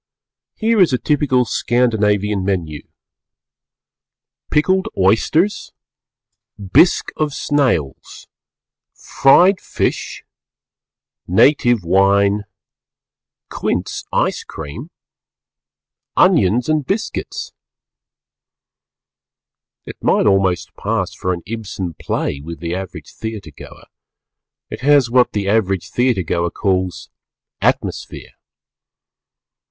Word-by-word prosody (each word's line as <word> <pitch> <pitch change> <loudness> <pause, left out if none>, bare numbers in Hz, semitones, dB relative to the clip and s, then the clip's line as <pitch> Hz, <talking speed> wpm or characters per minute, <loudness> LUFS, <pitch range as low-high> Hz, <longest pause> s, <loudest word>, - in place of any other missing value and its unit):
Here 225 0 +1
is 175 - +4
a - - +3
typical 135 -3 +1
Scandinavian 105 -5 0
Menu 85 -6 -3 1.6
Pjkled 185 +5 +2
Ojsters 115 - +1 0.9
Bjsque 100 - +3
of 150 -2 -1
Snajls 125 - -1 0.7
Frjed 180 +8 +4
Fjsh - - -3 1.1
Natjve 120 +3 +4
Wjne 100 +3 +2 1.1
Qujnce - - -3
Jce - - 0
cream 70 - -8 1.3
Onjons 110 +7 +3
and 155 -1 +1
Bjsqujts 210 +3 -3 2.3
It - - -9
might - - +2
almost 95 -3 +1
pass - - -2
for 90 - -3
an 85 -2 -4
Ibsen 100 -4 -5
Play 70 - -2
with 85 +3 -8
the 85 0 -4
average 90 -5 -7
theatre 110 -7 -7
goer; - - -13 0.9
it - - -6
has 140 -3 +3
what 125 0 +3
the 100 -2 -2
average 100 -3 0
theatre 120 -6 +1
goer 85 +2 -1
calls 95 -1 -2 0.5
"atmosphere." - - -2
105 Hz, 85 wpm, -18 LUFS, 95-130 Hz, 2.3 s, is